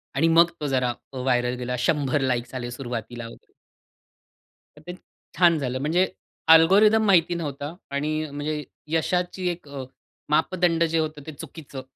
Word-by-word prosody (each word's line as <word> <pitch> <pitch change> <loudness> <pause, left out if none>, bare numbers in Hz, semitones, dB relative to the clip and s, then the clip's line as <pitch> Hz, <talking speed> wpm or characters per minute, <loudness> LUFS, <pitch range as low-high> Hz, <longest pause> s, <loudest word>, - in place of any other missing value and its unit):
आणि 165 - +3
मग 165 +1 +5
तो 150 - -1
जरा 130 -3 +1 0.2
अ, - - -6
व्हायरल 125 -1 +1
गेला. 125 0 -3
100 145 0 +1
लाइक्स 125 -2 -1
आले 120 -1 -4
सुरुवातीला 120 -2 -6
व - - -11 1.4
तर 150 - -15
ते 175 - -5 0.4
छान 170 -2 +5
झालं 130 -2 -2
म्हणजे 165 +7 +2 0.5
अल्गोरिदम 210 +7 +5
माहिती 175 -4 +4
नव्हता 145 -2 -5 0.2
आणि 150 +2 -1 0.2
म्हणजे 150 +1 -3 0.3
यशाची 180 +3 0
एक 175 -3 -6
अ, 140 -2 -6 0.5
मापदंड 165 +2 +2
जे 165 0 +1
होतं, 155 -1 -3
ते - - -5
चुकीचं 145 -2 -9
150 Hz, 150 wpm, -24 LUFS, 130-170 Hz, 1.4 s, मग